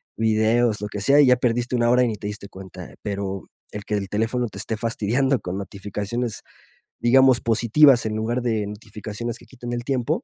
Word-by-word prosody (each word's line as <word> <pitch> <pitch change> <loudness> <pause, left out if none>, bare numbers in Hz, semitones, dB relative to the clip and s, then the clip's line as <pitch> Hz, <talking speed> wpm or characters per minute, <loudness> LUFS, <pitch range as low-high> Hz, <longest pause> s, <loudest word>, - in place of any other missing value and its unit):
videos, 110 +1 +2
lo 105 - -3
que 105 - -5
sea, 140 +7 +4
y - - +6
ya 125 0 +5
perdiste 120 0 0
una 120 -1 +2
hora 125 +1 +4
y - - +2
ni 110 - -2
te 105 - -6
diste 105 -1 -7
cuenta. 95 -2 -10
Pero 100 -2 -4 0.2
el 105 - -6
que 105 - -1
el 100 -2 -3
teléfono 115 +4 0
te - - -10
esté 110 - -3
fastidiando 120 +4 0
con 90 +1 -5
notificaciones, 105 +4 -4 0.6
digamos, 130 +1 +5
positivas 120 +4 +4
en 110 -1 -2
lugar 115 +3 -1
de 110 -4 0
notificaciones 110 +2 -6
que - - -16
quiten 120 -2 -7
el 120 0 -3
tiempo. 125 -2 -1
115 Hz, 200 wpm, -23 LUFS, 105-120 Hz, 0.6 s, y